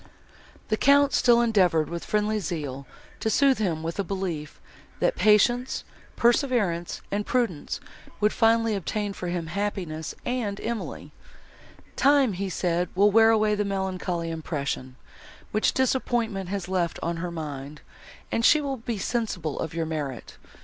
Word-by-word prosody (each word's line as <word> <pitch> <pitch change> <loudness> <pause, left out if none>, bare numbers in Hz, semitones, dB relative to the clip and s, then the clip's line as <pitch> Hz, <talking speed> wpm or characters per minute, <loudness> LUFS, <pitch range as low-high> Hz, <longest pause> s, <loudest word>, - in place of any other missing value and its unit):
The 215 - +1
Count 280 +2 +5
still 240 -1 +5
endeavoured, 185 -9 +3
with 170 0 -5
friendly 210 0 0
zeal, 145 -8 -4 0.3
to 220 - 0
sooth 275 +2 +3
him 170 -7 -1
with 165 +4 -4
a - - +2
belief, 180 -5 -4 0.4
that - - +2
patience, 240 +4 +3 0.3
perseverance 235 - +1
and 205 +1 0
prudence 220 -11 -1 0.4
would 210 0 +2
finally 225 -1 +3
obtain 205 +1 -2
for 180 - -6
him 175 -1 -2
happiness 170 -4 -3
and 235 -5 -2
Emily: 235 -1 -5 0.8
"Time," 275 -5 +4 0.2
said 175 0 0
he, 180 - -11
"will 205 +1 +6
wear 225 +1 +6
away 215 -1 +3
the 210 0 +1
melancholy 185 -4 -2
impression, 140 -5 -4 0.6
which 215 - +2
disappointment 235 -7 0
has 195 -2 -3
left 180 -2 -1
on 170 0 -1
her 175 +1 -3
mind, 150 -3 -6 0.5
and 230 - 0
she 305 - +6
will 275 -2 -3
be 230 -1 -4
sensible 195 - -2
of 160 0 -4
your 165 -1 -1
merit. 145 -6 -5
200 Hz, 145 wpm, -26 LUFS, 165-225 Hz, 0.8 s, will